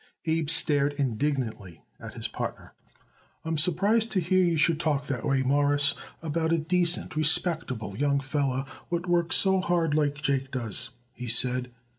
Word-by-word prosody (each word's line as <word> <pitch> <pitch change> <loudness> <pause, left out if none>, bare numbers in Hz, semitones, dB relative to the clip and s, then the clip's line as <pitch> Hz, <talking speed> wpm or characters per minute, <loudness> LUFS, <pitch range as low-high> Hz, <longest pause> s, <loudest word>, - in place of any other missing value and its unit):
Abe 160 -2 -1
stared 145 -3 +3
indignantly 125 - -3 0.2
at - - -10
his - - -3
partner. - - -7 0.7
"I'm 160 -1 -2
surprised 205 +8 +2
to 195 - +1
hear 185 +2 +1
you 175 -2 +2
you - - -1
should 155 +1 +2
talk 150 -4 -1
that 130 -6 -4
way, 135 -1 0
Mawruss, 145 +1 +2 0.3
about 160 +1 -2
a 165 - +2
decent, 170 +2 0
respectable 155 - +2
young 140 +3 0
feller 135 -1 -2 0.2
what 170 0 -3
works 175 -1 +2
so 190 -1 +4
hard 170 -4 0
like 145 -1 0
Jake 135 -2 -2
does," 120 -2 -1 0.2
he 125 0 -8
said. 125 +2 +3
145 Hz, 160 wpm, -26 LUFS, 135-165 Hz, 0.7 s, so